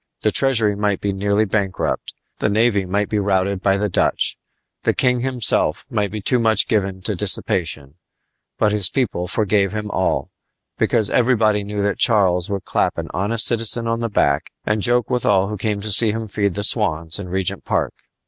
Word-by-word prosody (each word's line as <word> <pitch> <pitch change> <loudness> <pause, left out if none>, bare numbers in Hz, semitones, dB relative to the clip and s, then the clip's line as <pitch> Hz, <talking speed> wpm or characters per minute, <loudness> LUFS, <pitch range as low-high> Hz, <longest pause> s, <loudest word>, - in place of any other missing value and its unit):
The - - +1
treasury 115 -6 +2
might 100 -1 -1
be 100 -1 -2
nearly 100 +2 +1
bankrupt; 95 -2 -2 0.2
the - - +1
navy 105 -2 +2
might 100 +2 0
be 105 - -1
routed 95 -1 0
by 95 0 +2
the 105 +1 0
Dutch; - - +1 0.5
the - - 0
king 125 -1 +2
himself 125 -3 0
might 105 -3 0
be 105 0 -6
too 125 - +1
much 110 -1 +2
given 95 -3 -1
to - - -1
dissipation; 75 -4 -1 0.6
but 105 - +2
his 105 -4 +3
people 100 -9 -2
forgave 100 0 0
him 105 -1 -4
all, 95 - -1 0.5
because 110 -3 +1
everybody 110 -4 +2
knew 100 0 -3
that 100 0 -1
Charles 95 -7 +3
would 100 -2 -3
clap - - 0
an - - -5
honest 105 +5 +2
citizen 115 0 +3
on 115 0 -1
the 115 0 -2
back 70 -8 +1 0.2
and 105 0 0
joke 120 +2 +2
with 125 -1 0
all 100 -1 +2
who 105 - -4
came 105 0 -2
to 110 +1 -2
see 110 +3 +4
him 110 +1 -4
feed 100 -2 -1
the 100 - -3
swans 85 -8 -1
in 90 -3 -7
Regent's 95 0 -3
Park. - - -1
105 Hz, 190 wpm, -20 LUFS, 95-110 Hz, 0.6 s, see